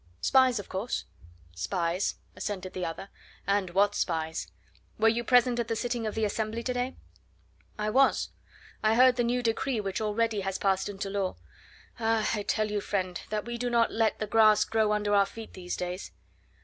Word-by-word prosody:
"Spies, 260 -2 +4
of 205 - -5
course?" 195 +6 -3 0.5
"Spies," 170 - -1 0.2
assented 190 -3 -4
the 185 - -4
other. 175 +4 -5 0.4
"And 200 -2 +1
what 200 +3 +3
spies! 160 -3 -2 0.5
Were 220 - +4
you 235 +1 0
present 245 0 +4
at 235 - -1
the 225 - -1
sitting 235 -1 -2
of 215 - -4
the 220 -1 +1
Assembly 220 +2 -2
to 250 - -1
day?" 250 +1 -2 0.8
"I 210 0 -1
was. 270 +3 +3 0.5
I 215 +1 +3
heard 255 +1 +6
the 240 - +1
new 245 +1 0
decree 230 +1 0
which 195 0 -3
already 215 0 0
has 195 0 -2
passed 195 0 +1
into 195 0 -5
law. 195 -2 -1 0.6
Ah! 225 -1 +1
I 210 - -1
tell 215 +1 0
you, 205 -1 -1
friend, 185 -3 -2
that 210 0 -2
we 240 0 -5
do 245 0 -1
not 235 -1 +3
let 225 -1 +1
the 215 - -2
grass 215 0 +5
grow 220 -1 +1
under 210 -1 +1
our 200 -1 +5
feet 225 +2 -10
these 180 -1 -5
days. 180 +1 -4
215 Hz, 190 wpm, -29 LUFS, 195-230 Hz, 0.8 s, heard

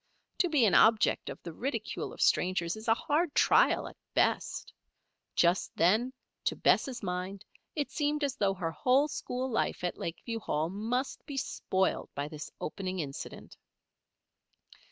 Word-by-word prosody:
To 360 - +3
be 290 -7 +4
an 200 - +3
object 220 -1 +4
of - - -7
the 170 - -7
ridicule 265 - -3
of - - -8
strangers 180 -1 +2
is 220 +2 -9
a 225 - +5
hard 300 +5 0
trial - - +4
at - - -12 0.2
best. - - 0 0.6
Just 175 +2 +2
then, 215 +9 +3 0.3
to - - +1
Bess' 255 -4 +2
mind, 185 +2 -4 0.3
it 290 -4 -2
seemed 295 +1 0
as 275 -3 0
though 200 -6 +1
her 170 -3 -2
whole 255 - +3
school 255 -3 -3
life 230 -6 -1
at 180 - -2
Lakeview 225 +7 -4
Hall 160 -5 -1
must 235 +7 -2
be 280 - -5
spoiled 190 -6 -1
by 140 +1 -2
this 150 0 -7
opening 185 +2 -4
incident. 140 -5 -6
215 Hz, 155 wpm, -31 LUFS, 180-265 Hz, 0.6 s, a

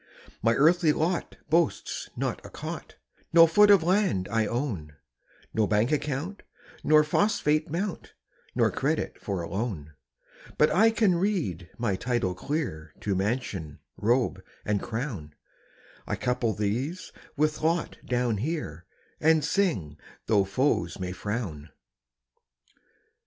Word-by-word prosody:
My 115 +1 +3
earthly 160 +1 +4
lot 170 +3 -1
boasts 165 0 +1
not - - -3
a - - -10
cot, - - -7 0.4
No 165 0 +9
foot 205 +6 +5
of 200 -5 +7
land 180 - +2
I 110 -1 +2
own, 105 - -3 0.6
No 110 -2 +2
bank 105 +5 +2
account 150 +6 -2 0.4
nor 155 0 +6
phosphate 155 -2 +1
mount, 175 +4 -4 0.4
Nor - - +3
credit - - -2
for 95 -4 -3
a - - -5
loan; 95 -7 -4 0.6
But 150 - +4
I 220 +5 +6
can 220 -4 +3
read 150 - -1
my 115 -5 0
title 115 -3 -1
clear 90 - -4
To 100 - 0
mansion, 95 - -2 0.2
robe, 115 -4 +1 0.2
and 105 -1 0
crown; 110 - -5 0.7
I - - -1
couple 125 -3 0
these 125 - -2 0.3
with 155 +1 +1
lot 165 +1 0
down 120 -3 0
here, 100 - -4 0.3
And 160 -1 +4
sing, 150 - 0 0.3
tho' 105 -3 +3
foes 95 -5 0
may 90 -1 -3
frown. 90 -5 -4
125 Hz, 125 wpm, -27 LUFS, 95-160 Hz, 0.7 s, No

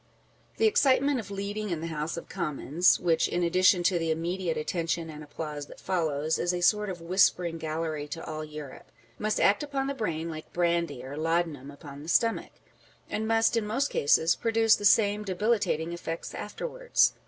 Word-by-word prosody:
The - - +3
excitement 285 - +3
of 205 -4 -7
leading 200 +1 -4
in 170 -3 -2
the 165 - -5
House 160 0 -3
of 170 - -7
Commons 170 -1 +1
(which, 165 -2 +2
in 175 - -1
addition 180 +1 +4
to 175 -1 +2
the 165 -1 -1
immediate 170 +2 -1
attention 165 +1 -2
and 150 0 -9
applause 150 -1 -6
that - - -13
follows, 160 -4 -1
is 175 +1 0
a 175 - -3
sort 210 +2 +3
of 180 -2 -6
whispering 175 -1 +2
gallery 155 -1 -3
to 165 +3 -6
all 155 0 -5
Europe) 150 -2 -10 0.3
must 215 0 0
act 205 - +4
upon 280 -2 -2
the 275 - -2
brain 170 - -3
like 155 -1 -8
brandy 170 -7 0
or 135 +2 -7
laudanum 160 -4 -1
upon 145 -1 -11
the 155 - -8
stomach; 230 +5 +1 0.6
and 220 +1 -2
must, 225 +1 +3
in 225 -2 0
most 265 +7 0
cases, 160 +4 +3
produce 225 -1 +3
the 205 - -5
same 205 0 +4
debilitating 195 -4 0
effects 165 -1 -5
afterwards. - - 0
170 Hz, 180 wpm, -28 LUFS, 160-210 Hz, 0.6 s, addition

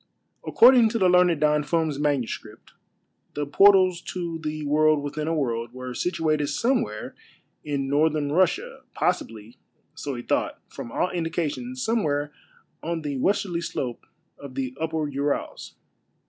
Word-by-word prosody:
According 240 -1 +6
to 230 - -1
the 190 -4 +3
learned 180 -3 +4
Don 150 0 +3
Finn's 155 -1 -1
manuscript, 145 -5 -3 0.6
the 145 - -2
portals 185 +3 +5
to 170 -2 -4
the 155 -1 -4
World 155 0 +3
within 150 +1 -4
a 165 - 0
World 120 -5 -2
were 130 0 -6
situated 155 -1 0
somewhere 145 - -1 0.5
in 140 -2 -2
Northern 145 0 +1
Russia, 185 - +1
possibly, 115 -11 -2 0.3
so 140 -2 -5
he 120 - -6
thought, - - -1
from 115 - -8
all 180 - 0
indications, 150 -7 -3
somewhere 150 -10 0 0.5
on 165 0 -3
the 145 -2 -3
westerly 175 +3 0
slope 125 -7 -5 0.3
of 140 -2 -10
the 130 -2 -2
tipper 160 +2 -2
Urals. 140 0 -3
150 Hz, 135 wpm, -25 LUFS, 140-170 Hz, 0.6 s, According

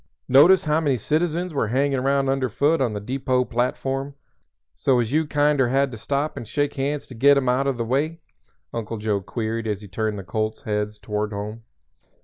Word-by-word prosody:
"Notice 170 +8 +6
how 155 +1 +2
many 140 -5 +1
citizens 170 - -1
were 135 -6 0
hanging 135 +5 +1
around 135 +1 +1
underfoot 135 +4 +1
on 120 -5 +1
the 105 - -3
depot 130 +3 0
platform 135 +3 -2 0.6
so 130 -2 +2
as 120 +2 -1
you 155 0 +2
kinder 145 -3 +2
had 135 +1 +2
to - - -6
stop 140 +6 -2
and 115 - -6
shake 145 +4 -1
hands 140 +1 -2
to - - -12
get 140 +4 +5
'em 135 -2 0
out 130 +2 +2
o' 135 - +2
the 120 -2 -3
way?" 150 +7 -1 0.5
Uncle 115 -1 -4
Joe 105 -2 -1
queried 115 +3 -3
as 105 -1 -2
he 105 - -10
turned 105 +2 -2
the 100 - -6
colts' 110 +3 -3
heads 105 0 -2
toward 105 0 -3
home. 105 +3 -6
130 Hz, 195 wpm, -23 LUFS, 110-140 Hz, 0.6 s, Notice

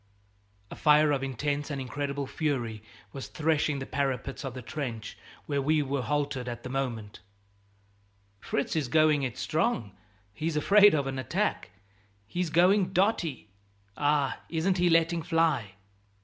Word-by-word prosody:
A - - -6
fire 150 0 +4
of 140 -2 0
intense 140 +3 -2
and 140 -2 -3
incredible 140 +2 -3
fury 130 -7 -2 0.3
was 135 - -6
threshing 155 -3 0
the 135 - -5
parapets 135 -2 -2
of 135 -2 -5
the 130 - -7
trench 115 -6 -5 0.3
where 140 -2 -1
we 150 +2 +2
were 140 -1 -2
halted 140 0 -2
at 120 0 -7
the 130 - -6
moment: 120 -6 -3 1.2
"Fritz 140 - -2
is 155 -5 0
going 155 +1 +4
it 125 -4 -3
strong; 155 - 0 0.4
he's 155 +6 -2
afraid 205 +4 +6
of 140 -2 0
an 135 0 -3
attack, 130 - -1 0.6
he's 175 - -2
going 185 +3 +3
dotty. 180 - 0 0.5
Ah, 145 -2 +1
isn't 175 +3 0
he 175 0 +4
letting 165 0 +3
fly!" 160 - +1
145 Hz, 145 wpm, -28 LUFS, 130-160 Hz, 1.2 s, afraid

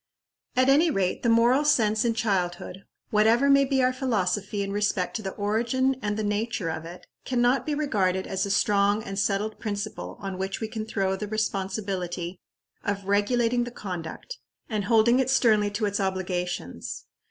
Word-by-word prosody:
At 255 +1 +4
any 295 +5 +5
rate, 190 -10 0
the 235 - +1
moral 235 +5 +4
sense 220 -7 +3
in 230 -2 +1
childhood, 190 -3 -2 0.3
whatever 225 +6 +4
may 275 0 +5
be 265 -1 +1
our 255 0 +3
philosophy 205 -5 -1
in 200 - -4
respect 205 -3 -1
to - - -7
the 190 -2 -5
origin 235 +6 +1
and 205 -1 -2
the 215 - -1
nature 210 -3 -1
of 160 0 -5
it, 175 +2 -10 0.2
can 250 -2 -1
not 245 +2 +2
be 300 - 0
regarded 195 -11 0
as 190 -1 -2
a 200 - -2
strong 205 +1 +2
and 195 -1 -4
settled 205 +2 -1
principle 205 -2 -5
on 195 -2 -5
which 195 +1 -3
we 220 - -3
can 220 0 -5
throw 195 -3 0
the 210 +2 -5
responsibility 190 -4 -3 0.4
of 200 -1 -2
regulating 230 +4 +2
the 240 - -5
conduct, 185 - -7 0.3
and 210 -3 -2
holding 235 +2 +4
it 260 -1 +1
sternly 215 -5 +3
to 205 +2 -2
its 205 0 -1
obligations. 180 - -3
210 Hz, 175 wpm, -26 LUFS, 195-235 Hz, 0.4 s, any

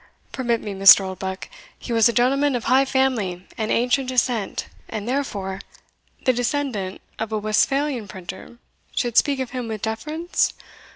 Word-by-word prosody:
"Permit 240 -3 -1
me, 205 - -5
Mr. 195 +1 +8
Oldbuck 190 0 -5 0.3
he 240 - -5
was 230 +1 +5
a - - +2
gentleman 270 +4 +2
of 240 - -2
high 260 +3 +4
family, 230 -10 0
and 220 -1 -2
ancient 250 +3 +1
descent, 245 -5 0 0.2
and 215 0 -5
therefore" 205 -8 -2 0.6
"The 255 - +4
descendant 245 -6 -2 0.2
of 220 0 -3
a 215 - 0
Westphalian 240 +3 +1
printer 190 +5 -9 0.4
should 240 -3 -1
speak 280 0 +3
of 260 -2 -3
him 250 -2 -4
with 220 -2 -5
deference? 305 +11 -1
235 Hz, 155 wpm, -22 LUFS, 205-265 Hz, 0.6 s, Mr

